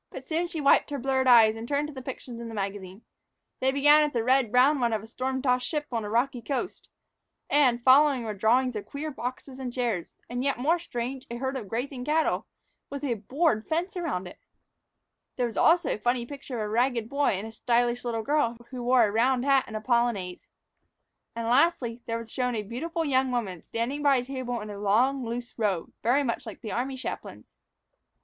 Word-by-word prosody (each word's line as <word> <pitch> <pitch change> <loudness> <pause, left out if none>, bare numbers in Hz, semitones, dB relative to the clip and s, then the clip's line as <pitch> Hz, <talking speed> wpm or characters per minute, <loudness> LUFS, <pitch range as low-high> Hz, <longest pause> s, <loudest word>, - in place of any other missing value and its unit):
But - - -10
soon 335 +2 0
she 340 -2 -5
wiped 280 -1 +4
her 285 - -3
blurred 265 0 0
eyes 225 -3 +7
and 225 +1 -7
turned 285 +2 0
to 300 - -9
the 260 - -7
pictures 250 -2 -7
in 235 - -6
the 225 - -7
magazine. 195 0 -5 0.6
They 260 +1 +2
began 295 +2 +6
with 295 -3 -2
a 230 - +1
red 255 -2 +3
brown 265 +4 +4
one 235 -2 +1
of 215 -1 -2
a - - -9
storm 260 +3 -3
tossed 250 -2 +1
ship 300 -2 -2
on 230 -2 -1
a 205 - -5
rocky 240 +2 0
coast; 275 - -4 0.6
and, 250 -5 +3
following, 270 0 +5
were 220 -2 -3
drawings 240 +5 +2
of 210 - -5
queer 300 +2 -5
boxes 255 +1 -6
and 255 -2 -4
chairs 235 -8 -2 0.2
and, 245 +1 -3
yet 275 0 0
more 315 +8 +2
strange, 255 -4 -5
of - - -38
a 235 - -5
herd 265 +1 -2
of 235 -6 -5
grazing 250 +2 -3
cattle 310 +3 +1 0.4
with 280 +1 -6
a 265 -4 +1
board 230 - 0
fence 340 +4 -1
around 320 - -2
it! - - -12 1.0
There 250 - 0
was 230 - -5
also 340 +2 +4
a - - -5
funny 245 +1 0
picture 275 -1 -8
of - - -1
a - - -4
ragged 235 0 +1
boy 280 +1 +1
and 200 - -5
a 225 - -7
stylish 240 +1 0
little 230 -2 -2
girl 280 -4 +1
who 255 -1 -5
wore 245 0 +4
a 205 - -1
round 245 +4 +2
hat 275 -2 +4
and 220 - -8
a 215 - -3
polonaise. 235 -7 0 0.9
And, 230 0 -3
lastly, 245 -3 +2
there 230 0 -1
was 230 -1 -8
shown 250 -2 -1
a 215 - -2
beautiful 325 - -3
young 260 -2 +2
woman 200 -9 -2
standing 245 +6 -3
by 285 -1 +4
a 250 -1 0
table 255 -3 -4
in 210 0 -7
a 200 - -7
long, 245 +7 +2
loose 235 +1 -5
robe, 195 -6 -1
very 260 +5 +3
much 235 -3 -3
like 220 - -9
the 215 - -5
army 260 +2 -2
chaplain's. 260 - -7
250 Hz, 220 wpm, -27 LUFS, 230-275 Hz, 1.0 s, eyes